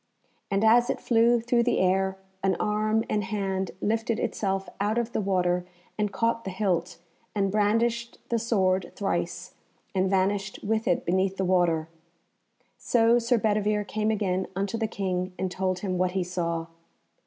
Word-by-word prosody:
And 195 +2 +1
as 240 +2 +5
it - - -1
flew 235 0 +3
through 235 +1 +2
the 245 - +1
air, 190 +1 +2 0.2
an 190 -1 +2
arm 215 +1 +1
and 210 -1 0
hand 190 -2 -2
lifted 225 +1 0
itself 195 -1 -1
out 210 +3 0
of 235 0 -1
the - - -1
water, 180 -2 +1 0.3
and 210 -1 -1
caught 230 +1 0
the - - -4
hilt, 180 -4 -1 0.4
and 195 -2 +1
brandished 230 +3 +1
the 235 - +1
sword 190 -5 +1
thrice, 200 - -2 0.4
and 190 -1 +1
vanished 195 +1 0
with 220 +1 0
it 175 - +1
beneath 190 +2 +1
the 190 - 0
water. 175 -3 +2 0.9
So 235 0 +3
Sir 240 +1 +2
Bedivere 210 -1 +1
came 215 +1 -1
again 190 -4 0
unto 200 +3 -1
the 225 -1 0
King, 185 -3 -2
and 190 -1 -2
told 185 -1 -1
him 185 -3 -2
what 180 0 +1
he 190 -1 0
saw. 170 -2 -2
200 Hz, 165 wpm, -27 LUFS, 185-220 Hz, 0.9 s, as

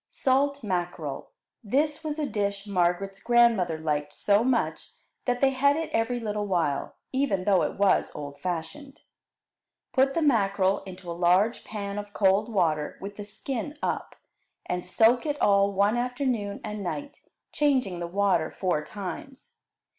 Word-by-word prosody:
Salt 280 +1 +1
Mackerel 175 -7 -3 0.3
This 295 +8 0
was 305 -1 -3
a 305 - -1
dish 200 -4 -2
Margaret's 195 0 0
grandmother 235 -9 +3
liked 150 -2 -2
so 205 +2 +2
much 250 -1 -1 0.3
that 245 -1 0
they 270 -1 +5
had 280 +2 +3
it 320 0 -3
every 225 +2 +1
little 210 -2 -2
while, 165 -7 -1 0.2
even 260 -9 +1
though 195 -1 +4
it - - -1
was 200 -1 +3
old 145 -1 -7
fashioned. 185 - -5 0.9
Put 270 0 +3
the 335 - +1
mackerel 200 -7 +2
into 180 -2 -8
a - - -2
large 180 +6 +2
pan 200 -1 -5
of 205 0 -9
cold 200 +3 +2
water 160 -7 0
with 200 +1 -7
the 205 - -6
skin 260 +7 -5
up, - - -2 0.5
and 180 0 -2
soak 230 - +3
it 290 -1 -2
all 200 0 +4
one 200 +3 +2
afternoon 245 -4 -2
and 210 0 -5
night, 285 +10 -5 0.3
changing 260 - +1
the 170 - -3
water 195 -2 +1
four 175 -5 -1
times. 235 - -8
205 Hz, 155 wpm, -27 LUFS, 185-260 Hz, 0.9 s, they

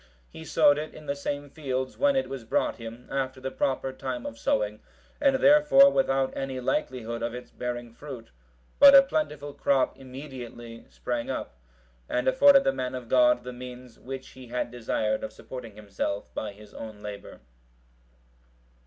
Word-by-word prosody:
He 160 - -10
sowed 150 -3 +4
it 155 - -6
in 155 - -11
the 140 0 -2
same 145 0 -4
field, 130 -4 -3
when 285 -1 +3
it 265 - +1
was 135 -3 -6
brought 115 - 0
him, 115 +1 -9
after 130 -1 -2
the 135 +1 -4
proper 135 0 -1
time 130 -2 -5
of 115 - -7
sowing, 105 0 0 0.4
and 275 -2 +4
therefore 280 0 +7
without 135 - +1
any 135 -1 -3
likelihood 120 -2 -2
of 115 +1 -2
its 125 - -9
bearing 120 -1 -5
fruit; 125 -3 -9 0.5
but 280 -1 +10
a 275 - +10
plentiful 150 - -2
crop 135 -2 +1
immediately 125 -3 -9
sprang 120 -1 -4
up, - - -4 0.6
and 125 - 0
afforded 275 +1 +7
the - - +2
man 130 -1 -3
of 125 -2 -7
God 125 -1 +4
the 125 0 -7
means 125 -1 -10
which 135 0 -7
he 130 -1 -13
had 120 0 -3
desired 110 -2 -1
of 110 - -4
supporting 115 -2 -9
himself 100 -1 -4
by 105 - -4
his 105 +1 -15
own 110 -2 -9
labour. 105 -1 -8
130 Hz, 170 wpm, -27 LUFS, 115-140 Hz, 0.6 s, but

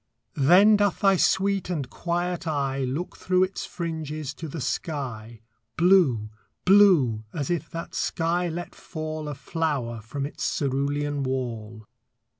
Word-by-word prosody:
Then 185 +9 +6
doth 205 -2 +1
thy 195 -1 +5
sweet 195 +1 +1
and 150 -7 -2
quiet 175 +3 -2
eye 140 -3 -1
Look 145 +8 -4
through 185 0 +2
its 185 +1 -3
fringes 155 -4 -4
to 160 +2 -7
the 155 +2 -6
sky, 125 -6 -4 0.4
Blue 160 - +4 0.3
blue 180 - +5
as 145 0 -2
if 165 -2 -2
that 165 0 -7
sky 175 +2 0
let 175 +2 -5
fall 155 -2 -6
A 145 - -5
flower 135 -9 -2
from 135 +6 -4
its 145 - -6
cerulean 145 +1 -1
wall. 115 -5 -4
155 Hz, 135 wpm, -25 LUFS, 135-175 Hz, 0.4 s, Then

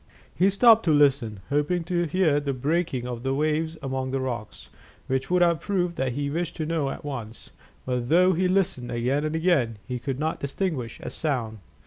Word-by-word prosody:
He 185 +3 +3
stopped 225 +3 +6
to 165 - +3
listen, 135 -8 +3
hoping 150 +5 +1
to 175 0 0
hear 160 -3 +2
the 140 -1 -2
breaking 140 -1 -1
of 120 -2 -5
the 135 +1 -1
waves 155 +2 0
among 130 -1 -2
the 135 +1 -1
rocks, 120 -5 -5 0.3
which 130 0 -2
would 180 0 +4
have 170 -2 +2
proved 180 -4 -1
what 130 -2 0
he 145 +2 -2
wished 170 +2 -2
to 160 - -3
know 155 -3 -1
at - - -7
once; 120 -6 -7 0.3
but 125 -1 -2
though 180 +3 +5
he 180 +2 +1
listened 180 -10 0
again 125 +5 0
and 155 +1 -2
again, 155 - +1
he 125 -1 -3
could 130 +1 -3
not 155 +2 -2
distinguish 140 - -3
a - - -6
sound. 120 -8 -2
145 Hz, 195 wpm, -25 LUFS, 130-170 Hz, 0.3 s, stopped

